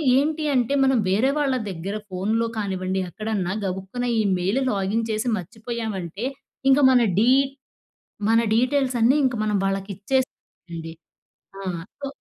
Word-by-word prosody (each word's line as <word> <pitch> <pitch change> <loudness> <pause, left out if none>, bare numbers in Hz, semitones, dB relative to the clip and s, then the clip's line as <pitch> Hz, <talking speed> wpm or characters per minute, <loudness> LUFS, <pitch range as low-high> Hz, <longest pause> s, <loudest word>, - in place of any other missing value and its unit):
ఏంటి 305 +3 +1
అంటే, 250 +1 +2
మనం 265 -1 +3
వేరే 215 +8 +3
వాళ్ళ 275 -3 +1
దగ్గర 190 +3 -4
ఫోన్‌లో 215 +5 0
కానివ్వండి, 190 -2 -1
ఎక్కడన్నా, 195 0 -2
గబుక్కున 190 +6 -3
ఈ - - +4 0.2
మెయిల్, 190 +8 0
లాగిన్ 205 +3 0
చేసి, 215 +3 -1
మర్చిపోయామంటే, 215 -1 -5 0.5
ఇంక 270 - +5
మన 250 -1 +5 0.2
డీ 235 +4 +5 1.0
మన 225 0 +5 0.2
డీటెయిల్స్ 255 +1 +2
అన్నీ 250 +6 +5
ఇంక 255 -2 +1
మనం 210 -1 +1
వాళ్ళకి 195 0 -2
ఇచ్చేస్ 260 +6 0 0.4
అండి. 165 -1 -6 0.7
ఆ! - - -7 0.4
సో 280 - -4
220 Hz, 140 wpm, -24 LUFS, 190-250 Hz, 1.0 s, ఇంక